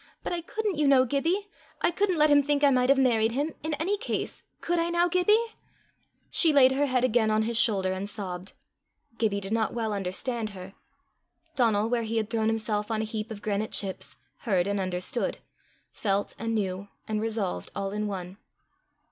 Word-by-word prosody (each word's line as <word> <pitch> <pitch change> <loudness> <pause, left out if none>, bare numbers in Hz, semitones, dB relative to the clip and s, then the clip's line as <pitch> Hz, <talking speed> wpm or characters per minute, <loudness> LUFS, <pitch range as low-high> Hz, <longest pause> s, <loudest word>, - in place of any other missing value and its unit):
but - - -3
I 345 - -2
couldn't, 415 +1 -3
you 295 - +3
know, 265 -2 +5
Gibbie. 330 - 0 0.4
I - - +4
couldn't 375 0 0
let 305 0 +4
him 290 0 +6
think 290 0 0
I 285 - +6
might 250 -1 +2
have 275 - +5
married 230 -4 +3
him 290 +5 -1
in 310 -1 -2
any 355 +8 -1
case: - - -3 0.2
could 345 0 -1
I 335 +1 0
now, 345 +1 +2
Gibbie?" 420 +6 +2 0.8
She 330 - +7
laid 265 -3 +6
her 285 +2 +1
head 255 -2 +1
again 235 -3 +2
on 215 0 +2
his 230 +1 -2
shoulder 195 -5 +3
and 190 +2 -4
sobbed. 185 -2 -6 0.7
Gibbie 210 -3 +1
did 195 +2 -4
not 225 0 0
well 225 -2 -1
understand 205 +2 -4
her. 185 +1 -9 0.8
Donal, 225 -5 +2
where 240 0 0
he 225 0 -2
had 220 -1 -2
thrown 220 -2 0
himself 215 -1 -1
on 220 -1 0
a - - -2
heap 215 0 -5
of 210 -2 -8
granite 215 +1 -2
chips, 195 -2 -3 0.2
heard 190 -7 0
and 200 0 -1
understood, 185 +5 -2 0.5
felt 200 -1 -1
and 225 0 -2
knew 195 -1 -2 0.2
and 215 -1 -1
resolved 220 -4 -2
all 195 0 -3
in 210 +1 -2
one. 185 -1 -6
225 Hz, 195 wpm, -27 LUFS, 205-285 Hz, 0.8 s, She